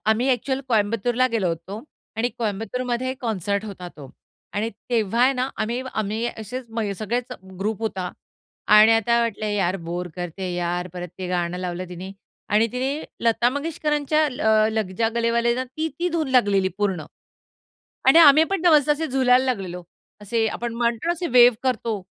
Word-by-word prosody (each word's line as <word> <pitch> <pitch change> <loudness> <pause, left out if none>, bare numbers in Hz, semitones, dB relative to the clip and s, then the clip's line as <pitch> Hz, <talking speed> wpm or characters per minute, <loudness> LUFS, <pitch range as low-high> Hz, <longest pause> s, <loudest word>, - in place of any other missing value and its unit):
आम्ही 220 +3 +2
एक्चुअल 260 +2 0
कोयंबतूरला 230 +2 +1
गेलो 225 -6 0
होतो 170 +6 -5 0.3
आणि 230 +2 +1
कोयंबतूरमध्ये 240 +4 -2
कॉन्सर्ट 200 -3 -2
होता 190 -4 -7
तो. 140 -4 -11 0.4
आणि 215 +2 -1 0.2
तेव्हा 230 0 +1
आहे 260 +2 +5
ना, 255 0 -1
आम्ही 235 +3 -2
आम्ही 215 +2 -1
असेच 245 +4 -6
म 225 -2 -2
सगळेच 240 +3 -2 0.3
ग्रुप 210 +1 -2
होता 190 -5 -3 0.6
आणि 215 +1 +8
आता 230 +1 +3
वाटलं, 225 -2 -2
यार 195 -3 0
बोर 175 +1 -3
करते 180 +1 -4
यार. 175 +1 -2
परत, 180 0 -6
ते 185 -1 -4
गाणं 175 0 -1
लावलं 180 0 -4
तिने 180 +2 -8 0.4
आणि 215 +2 +3
तिने 270 +5 -2 0.2
लता 235 +1 +3
मंगेशकरांच्या, 300 +1 0
ल 250 - -6 0.3
लग 220 -4 -1
जा 225 -1 +3
गले 230 0 +1
वाले 235 0 +1
आहे 235 - +2
ना 255 - -1
ती, 310 +6 -4
ती, 355 - 0
धून 325 -4 -1
लागलेली 200 -7 +3
पूर्ण. 190 -6 -1 1.0
आणि 275 - +8
आम्हीपण 320 +4 +6
ना 355 - +5
मस्त 300 -2 +5
असे 305 +2 +1
झुलायला 260 -2 +3
लागलेलो. 190 -8 -3 0.4
असे 225 +2 0
आपण 235 +1 -4
म्हणतो 235 +2 -1
ना, 340 - +3
असे 345 +1 -4
वेव्ह 240 -1 +7
करतो. 230 -5 -1
225 Hz, 170 wpm, -23 LUFS, 195-255 Hz, 1.0 s, आणि